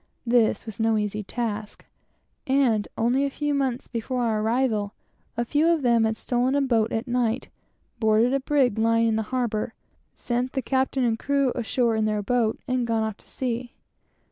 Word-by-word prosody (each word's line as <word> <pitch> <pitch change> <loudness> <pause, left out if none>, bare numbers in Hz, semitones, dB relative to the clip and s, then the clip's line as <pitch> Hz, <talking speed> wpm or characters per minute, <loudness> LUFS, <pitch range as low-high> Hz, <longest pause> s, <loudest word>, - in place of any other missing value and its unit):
This 235 -2 +2
was 220 -2 -8
no 225 0 +2
easy 210 0 -2
task; 215 0 -4 0.6
and 255 -6 +2
only 245 +4 +2
a 280 - +1
few 295 +1 -2
months 265 -3 -1
before 245 +2 -2
our 220 -2 +1
arrival, 220 -3 0 0.4
a 235 - 0
few 295 +6 +2
of 335 -4 +2
them 235 -2 +4
had 220 0 -1
stolen 250 +3 0
a 285 - +3
boat 230 -4 +1
at 225 +3 -2
night, 245 0 0 0.5
boarded 220 +3 +3
a 275 - +2
brig 260 -5 +1
lying 230 0 +3
in 220 - +1
the 220 - +1
harbor, 235 -3 -2 0.4
sent 245 +1 -2
the 265 - -1
captain 265 0 0
and 225 -2 +1
crew 280 -2 +1
ashore 240 -1 0
in 220 -1 +1
their 210 -1 0
boat, 230 0 +1
and 255 -2 0
gone 225 -1 +1
off 220 -1 -3
to - - -19
sea. 245 -1 -4
235 Hz, 185 wpm, -25 LUFS, 220-260 Hz, 0.6 s, them